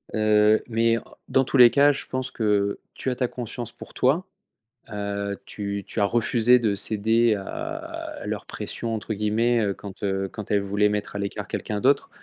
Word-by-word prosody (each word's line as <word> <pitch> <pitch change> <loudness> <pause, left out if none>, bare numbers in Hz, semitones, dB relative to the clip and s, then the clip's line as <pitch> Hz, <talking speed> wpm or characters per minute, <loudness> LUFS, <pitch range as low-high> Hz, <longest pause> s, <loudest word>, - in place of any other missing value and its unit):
Heu, 110 0 +4
mais 115 0 +2
en - - -17 0.3
dans 135 - +3
tous 140 - 0
les 120 -1 +10
cas 145 +1 +5
je - - -5
pense 130 0 -3
que, 115 - -5
heu, 100 -1 +1 0.2
tu 130 - -2
as - - -2
ta 125 - +1
conscience 120 -1 -6
pour - - -12
toi, 150 +9 +2 0.7
heu, 100 -1 -3
tu 100 -1 -4
tu - - -4
as 100 - +4
refusé 120 +2 +3
de 110 -4 +1
céder 110 +2 +2
à 100 - -5 0.8
à - - -7
leur - - -4
«pression» 115 -1 -4
entre 110 0 -4
guillemets, 110 +3 +1
heu, 100 -2 0
quand 100 -1 -10
heu, 95 -1 -1
quand 105 -3 -7
elles 100 -1 +3
voulaient 100 +1 +1
mettre 105 0 -3
à 100 - -2
l'écart 100 0 -4
quelqu'un 105 - -3
d'autre 140 +2 +3
110 Hz, 200 wpm, -24 LUFS, 100-120 Hz, 0.8 s, les